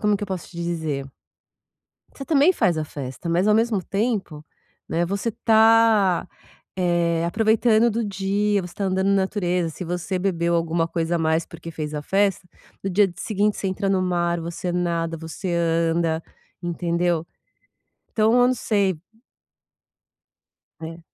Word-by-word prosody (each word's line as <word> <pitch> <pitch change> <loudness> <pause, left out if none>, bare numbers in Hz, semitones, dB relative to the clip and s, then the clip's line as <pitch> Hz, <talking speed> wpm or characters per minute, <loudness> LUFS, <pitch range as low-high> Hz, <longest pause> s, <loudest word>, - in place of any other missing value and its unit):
como 210 -1 +2
é - - +2
que 200 - -9
eu - - -11
posso 185 -3 -5
te 170 - -14
dizer? 160 -5 -3 1.1
Você 275 - -7
também 310 +4 +4
faz 175 - +1
a 155 - -1
festa, 140 +3 -7
mas 175 +4 +2
ao 210 - +5
mesmo 220 -4 +1
tempo, 195 -8 -2 0.4
né, 170 +1 0
você 200 +5 -2
tá, 220 -4 +4 0.5
eh, 170 -2 +1
aproveitando 220 +4 +3
do 230 +1 -1
dia, 200 +1 0
você 175 - -8
está 200 - -4
andando 190 0 0
na 200 - +4
natureza. 180 -4 -1
Se 180 - -7
você 180 +2 -3
bebeu 170 -2 0
alguma 165 0 0
coisa 165 0 -1
a - - -1
mais, 160 0 +1
porque 165 - -9
fez 155 -1 -5
a 150 - -3
festa, 195 0 +1 0.4
no 195 - -1
dia 200 +2 +4
d 175 - -12
seguinte 210 -1 0
você 195 - -2
entra 195 +1 -2
no 190 -1 +2
mar, 175 -1 0
você 170 +2 -4
nada, 170 -2 -1
você 165 +3 -5
anda, 165 -1 +1 0.4
entendeu? 170 -1 -1 0.8
Então, 220 0 +2
eu 245 0 +5
não 255 - +2
sei 200 -7 0 1.8
É. 165 +1 -7
180 Hz, 160 wpm, -23 LUFS, 170-205 Hz, 1.8 s, ao